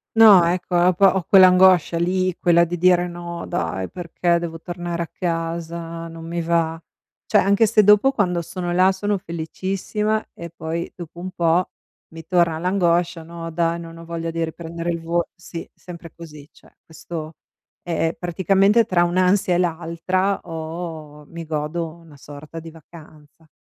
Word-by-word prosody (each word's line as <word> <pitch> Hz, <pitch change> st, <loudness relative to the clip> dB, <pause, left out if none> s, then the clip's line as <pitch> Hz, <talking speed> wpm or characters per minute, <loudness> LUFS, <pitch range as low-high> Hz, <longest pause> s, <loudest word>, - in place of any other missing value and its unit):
No 210 Hz, -6 st, +8 dB
ecco, 180 Hz, +1 st, -1 dB
ho 180 Hz, +1 st, +4 dB
po 195 Hz, +3 st, +3 dB
ho 190 Hz, -, 0 dB
quell'angoscia 185 Hz, -3 st, +6 dB
lì, 185 Hz, +1 st, 0 dB
quella 170 Hz, -1 st, +4 dB
di 175 Hz, +1 st, -2 dB
dire: 180 Hz, 0 st, +3 dB
"No 170 Hz, 0 st, -7 dB
dai 90 Hz, +3 st, -3 dB
perché 175 Hz, 0 st, -1 dB
devo 165 Hz, -1 st, -6 dB
tornare 175 Hz, -1 st, -4 dB
a -, -, -8 dB
casa, 165 Hz, -1 st, -4 dB
non 165 Hz, 0 st, -10 dB
mi 170 Hz, +1 st, -3 dB
va." 165 Hz, -1 st, 0 dB, 0.5 s
Cioè -, -, +4 dB
anche 200 Hz, +3 st, +4 dB
se 215 Hz, -1 st, +4 dB
dopo 210 Hz, +6 st, +5 dB
quando 180 Hz, -7 st, 0 dB
sono 175 Hz, +1 st, -5 dB
là 185 Hz, +2 st, +4 dB
sono 205 Hz, +1 st, -1 dB
felicissima 195 Hz, +5 st, -3 dB
e 170 Hz, 0 st, -8 dB
poi 165 Hz, +1 st, -5 dB
dopo 170 Hz, -1 st, -10 dB
un 185 Hz, +2 st, -5 dB
po' 170 Hz, 0 st, +1 dB, 0.4 s
mi 165 Hz, 0 st, -10 dB
torna 170 Hz, -2 st, +2 dB
l'angoscia: 175 Hz, -1 st, +1 dB
"No 165 Hz, 0 st, -8 dB
dai 170 Hz, +1 st, 0 dB
non 165 Hz, 0 st, -10 dB
ho 165 Hz, -, -11 dB
voglia 165 Hz, 0 st, -4 dB
di 165 Hz, 0 st, -2 dB
riprendere 165 Hz, +1 st, -5 dB
il 170 Hz, -1 st, -4 dB
vo" 170 Hz, +1 st, -1 dB
sì, 175 Hz, -1 st, -9 dB
sempre 170 Hz, -2 st, -11 dB
così. 155 Hz, -3 st, -12 dB
Cioè -, -, -23 dB
questo 160 Hz, -1 st, -8 dB, 0.5 s
è 165 Hz, -1 st, -1 dB
è 160 Hz, -, -2 dB
praticamente 195 Hz, +5 st, +3 dB
tra 180 Hz, -4 st, +2 dB
un'ansia 185 Hz, +1 st, +2 dB
e -, -, +2 dB
l'altra 175 Hz, +3 st, -1 dB
ho 160 Hz, -2 st, -7 dB
mi 165 Hz, -1 st, -8 dB
godo 155 Hz, +2 st, -3 dB
una 165 Hz, -3 st, -17 dB
sorta 145 Hz, +3 st, -10 dB
di 165 Hz, -, -10 dB
vacanza. 155 Hz, -1 st, -17 dB
170 Hz, 165 wpm, -21 LUFS, 165-180 Hz, 0.5 s, No